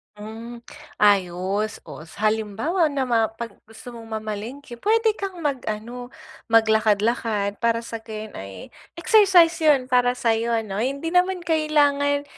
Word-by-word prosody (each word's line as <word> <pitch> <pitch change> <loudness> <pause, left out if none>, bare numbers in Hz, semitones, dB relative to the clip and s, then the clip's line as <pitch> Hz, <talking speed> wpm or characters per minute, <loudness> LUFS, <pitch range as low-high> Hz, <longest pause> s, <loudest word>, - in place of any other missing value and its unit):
Hmm, 225 +3 -9 0.4
ayos. 200 +1 +1
Oh, - - -10
sa 215 +6 0
halimbawa 220 - 0
nama 250 -6 +1
pag 235 -1 -6 0.2
gusto 225 +2 -11
mong 230 -1 -10
mamalengke, 220 +6 -7
p'wede 445 - +2
kang 390 -2 -5
mag-ano, 245 -2 -4 0.4
maglakad-lakad, 220 -1 +2
para 230 0 +1
sa 230 -1 -6
gayon 220 -1 -8
ay 95 -1 -9 0.3
exercise 375 -4 +5
yun 290 -5 +4
para 245 0 +3
sayo, 230 0 +1
'no? 195 -1 -4
Hindi 280 +6 -2
naman 360 0 +2
kailangan, 290 -3 +2
235 Hz, 125 wpm, -23 LUFS, 215-285 Hz, 0.4 s, exercise